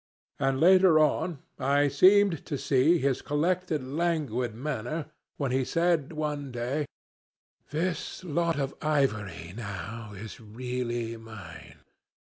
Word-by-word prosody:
And 135 0 +1
later 185 0 +6
on 155 0 +1 0.2
I 140 +2 +3
seemed 185 +4 +5
to 145 - -2
see 140 +4 +3
his 135 -4 0
collected 165 0 0
languid 135 -6 -1
manner, 150 +4 -4 0.3
when 140 -3 -1
he 130 +1 +2
said 165 0 +1
one 150 -3 -3
day, 125 +5 -2 0.8
'This 170 +3 -2
lot 170 -1 0
of 135 -1 -1
ivory 110 - 0
now 105 0 -6
is 110 +6 -8
really 120 0 -3
mine. 110 -7 -11
140 Hz, 115 wpm, -28 LUFS, 120-160 Hz, 0.8 s, later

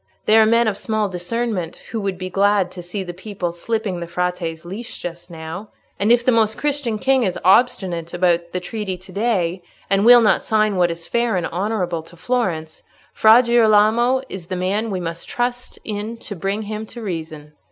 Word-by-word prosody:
They 215 - +4
are 220 - +6
men 230 +1 +4
of 205 -2 0
small 215 -2 -1
discernment 185 -1 -3 0.2
who 225 - -2
would 195 -2 -2
be 185 0 -6
glad 200 -1 +2
to 180 - -8
see 180 +3 -5
the 175 -1 -7
people 185 -1 -4
slipping 200 +1 -3
the 170 - -5
Frate's 175 -1 -3
leash 205 +7 -7
just 175 0 -7
now. 165 +5 -7 0.3
And 205 +4 +2
if 240 0 +4
the 255 - +5
Most 220 -2 +2
Christian 285 -6 -1
King 265 +4 +2
is 190 -6 0
obstinate 185 -6 +2
about 175 -1 +1
the 180 - -2
treaty 190 0 -4
to 185 +1 -14
day, 190 -4 0 0.3
and 195 0 +3
will 240 +1 +8
not 215 - +3
sign 215 -2 +1
what 175 -1 +3
is 170 0 -6
fair 235 -2 0
and 175 - -1
honourable 180 -2 -2
to 165 +2 -16
Florence, 170 -9 -2 0.3
Fra 220 +3 +6
Girolamo 235 +2 +4
is 185 -7 -8
the 185 - -3
man 200 +5 -1
we 190 -3 -2
must 170 -1 -5
trust 245 +1 -3
in 215 +2 -4
to 205 - -7
bring 195 +4 -2
him 215 +1 -5
to 235 +1 -9
reason." 155 -5 -6
200 Hz, 195 wpm, -20 LUFS, 175-225 Hz, 0.3 s, will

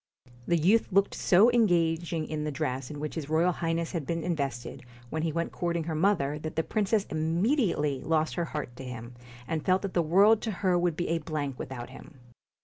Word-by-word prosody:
The 170 - +3
youth 200 +9 +3
looked 200 +1 +3
so 205 +7 +5
engaging 170 -7 +1
in 155 -1 -3
the 150 - -2
dress 130 -1 -3
in 150 - -7
which 150 0 -4
his 155 -3 -5
Royal 165 +3 +3
Highness 165 -1 -2
had 160 -6 -4
been 165 -1 -2
invested 140 -8 -3 0.3
when 160 - -2
he 160 0 0
went 170 +2 -2
courting 170 -1 -2
her 160 0 -3
mother, 155 -4 +1
that 155 0 -6
the 160 - +1
princess 210 +1 0
immediately 160 - +1
lost 155 +1 0
her 170 - -1
heart 150 -6 -5
to - - -7
him, 125 -1 -7 0.3
and 160 -2 -2
felt 185 +1 +2
that 195 - -3
the 175 - +3
world 200 +7 +5
to 225 - -2
her 185 -1 +4
would 175 -2 +1
be 175 - -2
a 165 0 +1
blank 150 -4 -4
without 125 -1 -6
him. 140 +3 -13
165 Hz, 210 wpm, -28 LUFS, 150-180 Hz, 0.3 s, so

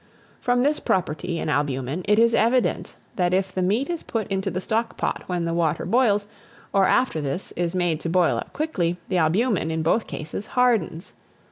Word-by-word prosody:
From 245 0 +1
this 295 +2 +2
property 175 -1 -1
in - - -3
albumen, 145 +1 -1
it 210 +1 +4
is 230 +1 +4
evident 240 +3 +1 0.2
that 180 -1 +2
if 190 -1 -1
the 185 - -1
meat 210 +9 +1
is 340 -2 -3
put 225 -3 -3
into 195 -1 -1
the 185 - -3
stock 225 +4 -2
pot - - -2
when 175 -2 -1
the 165 - -1
water 165 -2 0
boils, 215 -4 +2 0.5
or 195 -1 +4
after 245 -11 +2
this 145 +6 -4
is 175 +1 -1
made 175 -3 0
to 165 - -3
boil 175 0 +3
up - - -6
quickly, 180 - -1
the 185 - +1
albumen, 175 +2 +2
in 160 0 -1
both 195 +8 +1
cases, 155 +7 -6
hardens. 220 -9 +1
185 Hz, 195 wpm, -24 LUFS, 165-225 Hz, 0.5 s, it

